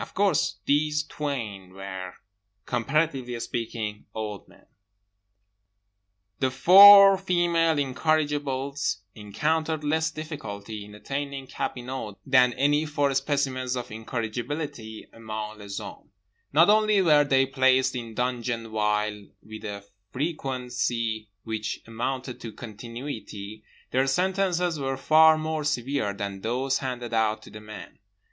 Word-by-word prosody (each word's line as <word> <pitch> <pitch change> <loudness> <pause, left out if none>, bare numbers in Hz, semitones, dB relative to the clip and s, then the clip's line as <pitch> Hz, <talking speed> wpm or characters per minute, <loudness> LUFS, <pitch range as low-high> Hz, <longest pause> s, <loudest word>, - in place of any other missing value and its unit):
Of - - -8
course 200 0 +2
these 150 +1 +2
twain 115 -12 -5
were, 95 -1 -7 0.5
comparatively 130 -1 -1
speaking, 115 -3 -4
old 105 -3 -5
men…. - - -21 1.7
The 130 - +2
four 195 +7 +9
female 170 -3 +2
incorrigibles 145 -3 -1
encountered 155 +10 -1
less 160 +2 +1
difficulty 110 -10 -7
in 105 0 -13
attaining 140 +4 -5
cabinot 125 -5 -5
than 130 -2 +4
any 145 +4 +2
four 145 -2 +1
specimens 135 -2 -1
of 125 -1 -6
incorrigibility 115 +1 -5
among 110 -1 -6
les 100 -1 -7
hommes. - - -8 0.4
Not 165 +7 +6
only 215 -1 +4
were 150 -4 +5
they 135 -2 +3
placed 130 -1 +2
in 115 -2 -6
dungeon 120 -2 -2
vile 105 -1 -1 0.2
with 110 0 -10
a 100 -1 -6 0.3
frequency 125 -6 -2
which 110 -1 -4
amounted 125 +3 -4
to 115 - -6
continuity; 110 -2 -8 0.3
their 130 +2 +2
sentences 180 +1 +1
were 135 -1 -2
far 155 +3 +6
more 155 0 -2
severe 140 -5 -1
than 100 -1 -5
those 130 +5 0
handed 125 -3 -5
out 110 -1 +1
to - - -13
the 105 - -10
men. 105 0 -11
130 Hz, 120 wpm, -26 LUFS, 110-150 Hz, 1.7 s, four